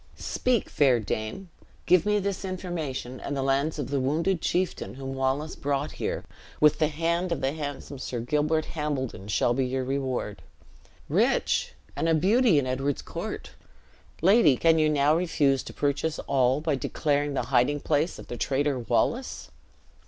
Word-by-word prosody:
Speak, 250 -4 0
fair 130 -5 +3
dame; 110 - -4 0.3
give 180 +2 +4
me 210 0 +3
this 200 -1 -2
information, 165 -9 -4
and 140 - -4
the 135 - -1
lands 140 +4 +1
of 140 -3 -4
the 140 - +1
wounded 160 +7 0
chieftain 180 -6 -1
whom 135 0 -5
Wallace 135 +3 -1
brought 145 +1 -2
here, - - -2 0.4
with 150 -1 +5
the 155 - +4
hand 170 +4 -1
of 170 - 0
the 135 - +1
handsome 145 -2 -6
Sir 125 -2 -4
Gilbert 150 +6 0
Hambledon, 135 - -3
shall 105 +3 +2
be 135 +2 +1
your 130 +1 -1
reward. 130 -6 -3 0.7
Rich, - - +1 0.2
and 165 - 0
a 165 - +4
beauty 205 - +4
in 140 - +2
Edward's 135 +2 -1
court! - - -6 0.7
Lady, 190 - +6
can 165 -1 +4
you 155 0 +3
now 150 0 +3
refuse 150 -6 +2
to - - -9
purchase 145 +2 -1
all, 130 +1 +2
by 155 -1 0
declaring 145 +1 0
the - - 0
hiding 130 +4 +3
place 155 +3 0
of - - -10
the 120 - -6
traitor 140 0 0
Wallace?" 235 - -1
145 Hz, 165 wpm, -27 LUFS, 135-165 Hz, 0.7 s, Lady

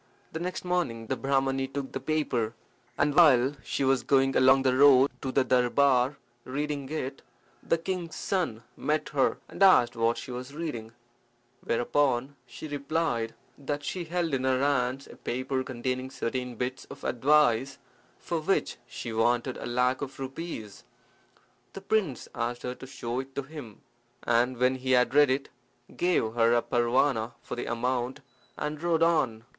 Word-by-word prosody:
The 160 - -4
next 180 +1 -4
morning 170 -11 -1
the 130 - -1
Brahmani 135 0 0
took 135 0 -5
the - - -4
paper, 130 -6 -1 0.4
and 145 0 +2
while 140 -5 +6
she - - -2
was 135 -1 +3
going 135 -1 +2
along 135 +1 +5
the 130 -1 +3
road 140 0 +6
to 130 - -3
the 135 - +3
darbar 130 +1 +3 0.3
reading 140 0 -3
it, 140 -3 -4 0.4
the 165 - +1
king's 170 0 -4
son 160 - -2
met 155 +1 -1
her, 135 -3 +1
and - - -11
asked 125 -12 +6
what 115 +1 +1
she - - -7
was 125 +3 -7
reading, 120 -9 -5 0.7
whereupon 130 +2 +1
she 120 +6 -8
replied 145 -5 -1 0.2
that 145 +1 -3
she 180 +2 -3
held 170 -2 -1
in 130 -1 0
her 130 -1 +2
hands 135 -1 0
a - - -13
paper 130 +2 -2
containing 130 +1 -3
certain 125 -1 -3
bits 125 +3 -4
of - - -12
advice, 135 -1 +3 0.4
for 170 - -3
which 185 +5 0
she 120 -1 -6
wanted 120 +3 +1
a - - -6
lac 125 +2 +1
of 135 -1 -6
rupees. 130 - -6 0.9
The 195 - -8
prince 195 - -1
asked 120 +1 -3
her 125 - -3
to 130 - -11
show 120 -2 -4
it 135 0 -7
to 140 - -2
him, 135 -7 -10 0.4
and 120 +2 +2
when 125 +2 +2
he 130 0 0
had 125 0 +3
read 145 -1 +6
it 135 +2 -1 0.5
gave 175 -11 +1
her 115 0 +4
a 120 - +2
parwana 120 0 +1
for - - -5
the 120 - -4
amount, 125 +1 -2 0.4
and 150 0 -4
rode 165 -1 +2
on. 135 -10 +2
130 Hz, 165 wpm, -28 LUFS, 120-145 Hz, 0.9 s, while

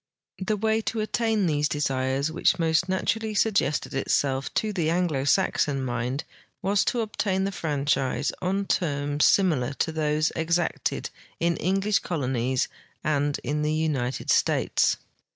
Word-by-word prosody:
The 210 +3 -1
waj^ 220 +1 +1
to 225 - -2
attain 220 -1 +1
these 150 -3 +1
desires 135 0 0
which 160 - +2
most 165 +2 +1
naturall}" 215 +3 -1
suggested 195 -9 +1
itself 135 0 0
to 215 -1 0
the 170 -5 0
Anglo 165 -6 0
Saxon 135 -1 +1
mind 125 +4 -2 0.4
was 195 +1 +2
to 240 - +1
obtain 200 -3 -1
the 195 - -1
fran 150 -6 -2
chise 135 -3 +1
on 195 +2 0
terms 145 -5 0
similar 150 -9 +3
to 160 - -1
those 155 0 +1
exacted 170 +1 -1 0.3
in 170 0 +1
English 195 +3 +1
colonies 130 -5 -1 0.4
and 145 -1 0
in 150 +1 -1
the 150 +1 0
United 140 -5 -1
States. - - +2
160 Hz, 140 wpm, -26 LUFS, 140-190 Hz, 0.4 s, similar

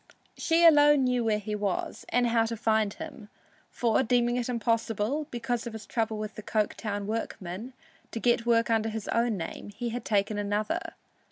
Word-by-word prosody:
She 335 +1 +3
alone 295 -3 +7
knew 250 -1 +1
where 220 -2 +2
he 210 0 -5
was, 205 -2 -2
and 245 0 +2
how 230 -1 +2
to 230 0 -4
find 220 -2 +2
him, 300 -10 -9 0.4
for 235 0 +1
deeming 240 -1 +2
it 245 0 -1
impossible, 230 +3 0
because 240 0 -3
of 235 - -6
his 220 -2 -8
trouble 220 -1 -1
with 215 0 -5
the - - -8
Coketown 210 -1 -2
workmen, 215 +1 -4 0.4
to 230 - -5
get 235 0 +2
work 230 -1 +3
under 225 0 +2
his 220 -1 -5
own 230 -2 +1
name, 165 +3 -6
he 235 +4 -4
had 240 0 -4
taken 205 -1 0
another. 205 +1 -2
225 Hz, 180 wpm, -28 LUFS, 215-245 Hz, 0.4 s, alone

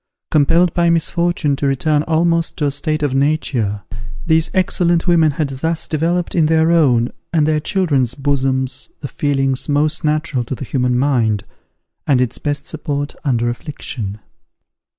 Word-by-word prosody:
Compelled 165 +3 +3
by 170 -1 +2
misfortune 170 -2 +1
to 140 - 0
return 145 +2 +1
almost 165 +1 0
to 150 - 0
a 140 - +1
state 155 +2 -1
of 145 -3 0
nature, 135 -8 0 0.4
these 160 0 +2
excellent 175 -2 +1
women 170 -3 +4
had 150 -1 -1
thus 160 +5 -2
developed 170 +3 -1
in 160 -3 +3
their 160 +1 +3
own 125 -8 +3 0.2
and 155 -3 +2
their 155 -1 +2
children's 150 - 0
bosoms 135 -2 -1
the 140 - -4
feelings 135 -1 -1
most 150 +1 +2
natural 150 -4 0
to 120 - -5
the 135 - -7
human 125 -1 0
mind, 120 -7 +1 0.6
and 135 -3 +3
its 125 -2 -1
best 145 0 -2
support 145 -2 -4
under 120 -4 0
affliction. 120 -5 -5
145 Hz, 150 wpm, -18 LUFS, 130-160 Hz, 0.6 s, women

